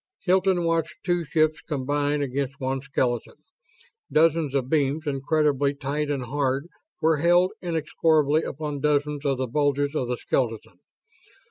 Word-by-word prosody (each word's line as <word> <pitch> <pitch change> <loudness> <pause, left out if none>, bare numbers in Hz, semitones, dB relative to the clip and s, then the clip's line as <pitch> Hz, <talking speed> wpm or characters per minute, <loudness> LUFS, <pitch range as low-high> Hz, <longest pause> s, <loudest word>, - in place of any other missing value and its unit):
Hilton 185 -1 +2
watched 165 -1 0
two 175 -1 0
ships 155 0 +1
combine 145 +1 -1
against 140 +1 -3
one 135 0 -2
skeleton. 125 -3 -2 0.8
Dozens 160 -2 +3
of 130 -2 0
beams, 150 +1 0
incredibly 145 0 +1
tight 145 +1 -2
and 140 -3 -1
hard, 135 +2 -1 0.4
were 160 -1 +4
held 175 +4 +4
inexorably 155 -2 +1
upon 150 -1 -4
dozens 150 0 0
of 135 -2 +1
the 130 - -1
bulges 145 +2 0
of 130 -5 -1
the 125 0 -2
skeleton. 115 -4 -2
145 Hz, 135 wpm, -25 LUFS, 135-155 Hz, 0.8 s, were